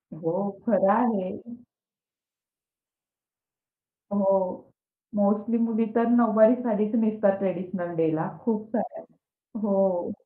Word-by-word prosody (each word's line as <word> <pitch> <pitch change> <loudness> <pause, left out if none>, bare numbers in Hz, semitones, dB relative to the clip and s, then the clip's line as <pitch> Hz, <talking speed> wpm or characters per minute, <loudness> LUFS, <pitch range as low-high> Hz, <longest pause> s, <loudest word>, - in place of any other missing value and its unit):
हो, 165 +1 -3 0.3
खरं 195 -3 +3
आहे. 215 -5 0 2.8
हो, 195 -2 0 0.4
मोस्टली 205 +3 +1
मुली 230 -1 0
तर 235 0 +3
नऊवारी 225 -1 +5
सारीच 215 0 0
नेसतात 215 -3 +1
ट्रेडिशनल 180 -2 -4
डेला 160 +2 0
खूप 220 -2 -1
साऱ्या. 330 -2 -4 0.6
हो. 195 -1 +1
205 Hz, 90 wpm, -25 LUFS, 185-225 Hz, 2.8 s, नऊवारी